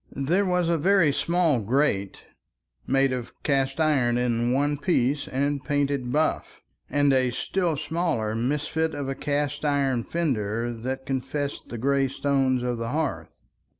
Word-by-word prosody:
There 175 +9 +1
was 180 -1 +1
a 170 -1 +1
very 185 -2 +4
small 165 -6 +1
grate, 105 -4 0 0.6
made 135 0 +2
of 125 -2 -5
cast 135 0 0
iron 135 -7 +2
in 120 -1 +1
one 145 +2 +1
piece 140 -2 +1
and 140 +1 -1
painted 140 -2 -1
buff, 155 +3 -1 0.3
and 145 -1 +3
a 130 -1 +3
still 165 +6 -1
smaller 155 -11 -1
misfit 150 +6 -1
of 140 -2 -4
a 135 - -1
cast 145 +1 -2
iron 140 -5 +1
fender 120 -8 -1
that 130 +3 -5
confessed 140 +2 -3
the 120 - -5
gray 135 +3 +2
stone 135 -2 0
of 120 -2 -2
the 115 0 -3
hearth. 150 +1 -3
140 Hz, 150 wpm, -25 LUFS, 125-150 Hz, 0.6 s, very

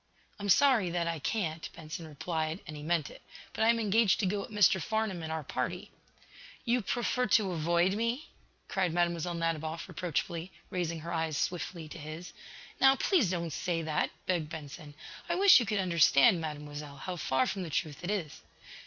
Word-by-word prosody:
"I'm 205 0 -3
sorry 240 -4 +5
that 170 0 -1
I 165 -1 -2
can't," 165 - -2
Benson 160 +1 -7
replied, 155 +2 -3
and 155 - -8
he 150 - -8
meant 160 -2 0
it. - - -14 0.3
"But - - 0
I - - +5
am 230 0 +4
engaged 210 -2 +3
to - - +1
go 200 +2 0
with - - -8
Mr. 205 -3 +4
Farnum 220 -1 -1
and 160 0 -5
our 160 -1 -3
party." 155 +8 -4 0.7
"You 240 +1 +2
prefer 245 +4 0
to 200 -4 +3
avoid 170 +3 +2
me?" 230 +7 -1 0.4
cried 180 -4 0
Mlle. 175 0 0
Nadiboff, 165 0 -2
reproachfully, 170 +1 -3 0.2
raising 170 -3 -2
her 170 - -5
eyes 160 -2 -1
swiftly 170 -2 -3
to 165 - -9
his. 155 +3 -8 0.5
"Now, 270 0 +6
please 285 - +2
don't 170 -3 -2
say 175 -3 -1
that," 155 -1 0 0.2
begged 170 -5 0
Benson. 150 -1 -9 0.3
"I 340 - +1
wish 390 -1 +8
you 235 - -2
could 210 0 0
understand, 170 -3 +5
Mademoiselle, 150 -2 -6
how 180 +6 -5
far 130 -6 +1
from 195 - -3
the 175 - -5
truth 155 0 -3
it 175 - -3
is." 185 -8 -3
170 Hz, 185 wpm, -31 LUFS, 155-195 Hz, 0.7 s, wish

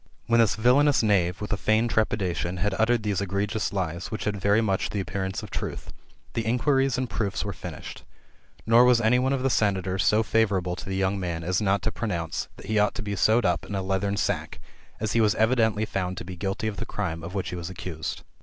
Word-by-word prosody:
When 115 0 +3
this 115 -3 +4
villanous 130 +4 +4
knave, 95 -4 +2
with 105 +1 -2
a - - -1
feigned 110 +3 +2
trepidation, 95 -5 0
had 100 +2 0
uttered 115 0 +2
these 100 -2 0
egregious 100 +2 -1
lies, 90 -3 -3
which 110 - -4
had 105 0 -1
very 100 +2 +4
much 100 -4 0
the 105 - -3
appearance 95 0 -3
of - - -9
truth, - - -5 0.4
the 115 - 0
inquiries 135 +3 +2
and 130 0 -1
proofs 100 -4 -2
were 100 - -3
finished. - - -8 0.6
Nor 115 +2 +6
was 125 -1 +5
any 120 +2 +3
one 130 +1 +1
of 135 -2 0
the 135 - +2
senators 95 -4 +1
so 110 +1 +3
favourable 100 -5 +1
to 95 - -8
the 95 - -2
young 95 +1 0
man, 85 -3 -3
as 90 +4 0
not 100 -1 +1
to 110 - 0
pronounce, 85 -9 -3
that - - -11
he 105 +1 +1
ought 105 - +2
to - - -4
be 100 -1 -3
sewed 110 +3 +3
up 90 -1 +1
in 100 - -5
a 95 - -1
leathern 100 +1 -1
sack, - - -2 0.4
as 110 -1 -1
he 115 - +3
was 105 -1 +3
evidently 110 -2 +2
found 95 -3 -3
to - - -6
be 90 0 -7
guilty 95 +4 -3
of 105 -2 -4
the - - -3
crime 85 -5 -3
of 90 +4 -7
which 95 - -2
he - - -5
was 85 -1 -5
accused. 85 -3 -5
100 Hz, 230 wpm, -26 LUFS, 95-110 Hz, 0.6 s, Nor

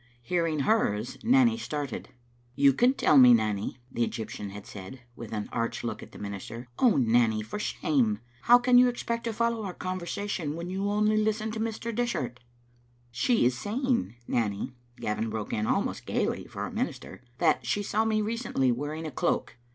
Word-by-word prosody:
Hearing 165 0 0
hers 125 - +1
Nanny 235 -1 +4
started. 145 - -4 0.5
"You 140 -1 +5
can 250 - +3
tell 150 - +5
me, 125 -2 +9
Nanny," 105 -1 -1
the 120 - 0
Egyptian 110 -3 -4
had 100 +1 -9
said, 120 +1 -9
with 115 -2 -9
an 105 -1 -3
arch 115 -1 -2
look 115 -2 -4
at - - -11
the - - -12
minister. 105 +4 -7
"Oh, 245 -5 +5
Nanny, 115 -3 +3
for 110 - -6
shame! 135 - +1 0.3
How 240 +1 +8
can 245 0 +5
you 250 - +7
expect 235 -1 -3
to 230 - 0
follow 230 +1 0
our 190 -3 -5
conversa 185 +2 -4
tion 155 -7 -2
when 170 +2 -5
you 195 +2 -1
only 210 +1 +2
listen 215 0 0
to 220 - -5
Mr. 230 +1 -3
Dishart?" 165 - -2 0.4
" 120 0 -35
She 240 - +3
is 125 0 +3
saying, 240 - -1
Nanny," 105 +1 -1 0.2
Gavin 110 -1 -2
broke 110 -1 -4
in, 110 0 0
almost - - -1
gaily - - -1
for - - -5
a - - -6
minister, - - -4
" 120 - -34
that 160 -3 +2
she 205 - 0
saw 215 +2 +1
me 215 -1 +1
recently 215 - 0
wearing 145 +6 -3
a 155 - -4
cloak. - - -1
150 Hz, 190 wpm, -28 LUFS, -, 0.5 s, me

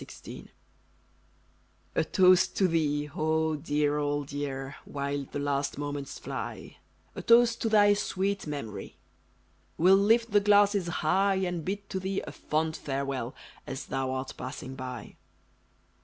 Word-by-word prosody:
THE - - -7
TOAST - - -11 1.4
A - - +2
toast 185 -1 +4
to 190 - +4
thee, 150 -3 +1
0 155 +1 0
dear 150 0 0
old 145 -1 -2
year, 140 -1 -4
While 140 0 -3
the - - -4
last 140 0 -1
moments 145 -1 -4
fly, - - -6 0.4
A - - -6
toast 235 0 +5
to 225 - +1
thy 205 -1 +6
sweet 195 -2 -1
memory 115 -10 -6 0.8
We'll 185 +4 +6
lift 225 +3 +3
the 205 - +6
glasses 205 -2 +4 0.2
high, 195 +4 +3
And 180 -3 -1
bid 200 +3 -4
to 190 - -1
thee 190 +1 -2
a - - -7
fond 155 +1 -1
farewell 135 -3 -3 0.3
As - - -5
thou 135 -1 -2
art 130 0 -4
passing 130 0 -7
by! 125 -4 -7
155 Hz, 140 wpm, -29 LUFS, 140-195 Hz, 1.4 s, thy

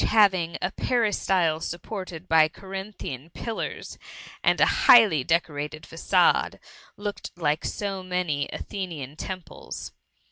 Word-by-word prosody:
having 190 -6 +3
a 180 - 0
peristyle 195 -10 +1
supported 180 0 -6
by 160 -1 +6
Corinthiaxi 190 - -7
pillars, 230 -2 -5 0.4
and - - +3
a - - +7 0.2
highly 205 - +8
decorated 155 -1 -1
facade, 165 - +2 0.4
looked 205 0 -5
like 155 -2 0
so 195 -2 -3
many 180 -6 -1
Athenian 160 -8 -6
temples. 185 +2 -7
180 Hz, 105 wpm, -26 LUFS, 155-195 Hz, 0.4 s, highly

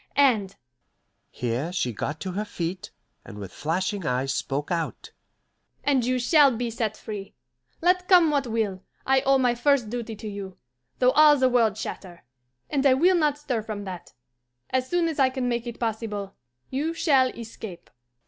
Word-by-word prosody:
And" 225 -9 +3 0.7
here 125 +7 -3
she 125 -10 -1
got 145 +8 -4
to 190 - -3
her 200 +4 -2
feet, 180 -3 -5 0.3
and 105 - -11
with 100 -2 -7
flashing 185 +6 -2
eyes 130 -1 0
spoke 145 +4 -3
out 165 -2 -3 0.7
"and 275 -4 +2
you 255 +2 +1
shall 275 0 +4
be 240 0 -2
set 220 -2 -2
free. 205 -3 -7 0.5
Let 360 +1 +2
come 350 -4 +6
what 280 -3 0
will, 215 -5 -1 0.2
I 265 0 +3
owe 270 0 +4
my 250 -2 +2
first 245 -2 +1
duty 235 -2 -4
to 215 - -8
you, 200 -2 -7 0.4
though 250 0 +4
all 300 0 +6
the 260 -1 +3
world 230 -4 +3
chatter; 185 -5 -7 0.4
and 275 -2 0
I 270 -2 +5
will 355 +7 +4
not 300 -4 +2
stir 265 -6 -2
from 210 -1 -6
that. 185 -3 -8 0.6
As 260 0 0
soon 350 -1 +2
as 320 -3 -3
I 265 -1 +5
can 260 -1 -2
make 240 0 -2
it 235 - -7
possible, 215 -3 -3 0.4
you 305 +5 -1
shall 275 -6 +4
escape." 220 -6 -9
230 Hz, 175 wpm, -25 LUFS, 195-270 Hz, 0.7 s, come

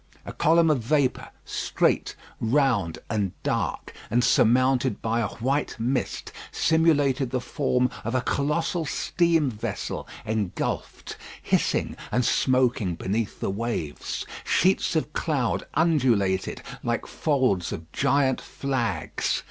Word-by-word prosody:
A - - -6
column 165 0 +4
of 145 - +2
vapour, 135 +2 +1 0.2
straight, - - 0 0.2
round, 115 - +1
and 105 -5 -1
dark, - - -2 0.2
and 120 +3 +2
surmounted 130 +2 +3
by 115 +1 0
a 115 - +1
white 135 +8 -1
mist, 125 +4 -2 0.2
simulated 145 -5 +2
the 130 +1 -1
form 125 -1 0 0.2
of 115 +3 -2
a 130 - +2
colossal 155 +6 0
steam 160 -1 +1
vessel 105 -1 -4 0.2
engulfed, 105 -4 -3 0.3
hissing, - - +1 0.2
and 125 0 +1
smoking 125 -8 +2
beneath 105 +5 -2
the - - 0
waves. 100 -8 -3 0.2
Sheets 185 -1 +2
of 155 -1 -1
cloud 135 -7 -1
undulated 125 - +2 0.2
like - - -1
folds 130 - 0
of 80 0 -7
giant 135 -1 +2
flags. 115 - -2
130 Hz, 115 wpm, -25 LUFS, 110-145 Hz, 0.3 s, column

